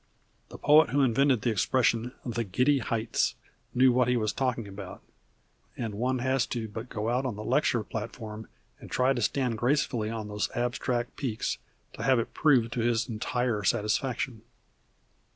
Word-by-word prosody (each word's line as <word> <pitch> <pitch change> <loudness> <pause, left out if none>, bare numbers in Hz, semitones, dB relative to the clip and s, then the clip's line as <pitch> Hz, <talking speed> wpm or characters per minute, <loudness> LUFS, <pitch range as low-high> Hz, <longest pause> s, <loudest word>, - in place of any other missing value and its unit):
The - - -9
poet 150 +2 +5
who 140 0 +2
invented 130 0 +3
the 120 - +2
expression 115 +2 +1
"the 120 -1 -1
giddy 125 +8 +2
heights" 115 -2 0 0.4
knew 130 +1 +6
what 125 0 +3
he 125 0 +2
was 110 -2 0
talking 125 -4 -1
about, 95 -1 -9 0.7
and 115 -3 -3
one 125 +5 0
has 130 0 +1
but - - -29
to 115 -3 -3 0.2
go 110 -2 -3
out 125 +2 +1
on 125 -5 -2
the 105 - -6
lecture 125 -2 +1
platform 110 0 -6 0.3
and - - -11
try 130 +1 +2
to 120 - -2
stand 120 0 0
gracefully 120 -4 +1
on 110 -2 -4
those 105 0 -2
abstract 120 0 -1
peaks 120 -6 -2 0.3
to - - -8
have 130 -2 +3
it 115 - -2
proved 125 -7 +3
to 120 - -3
his 115 0 +1
entire 115 -1 -1
satisfaction. 115 +3 0
120 Hz, 170 wpm, -28 LUFS, 110-130 Hz, 0.7 s, knew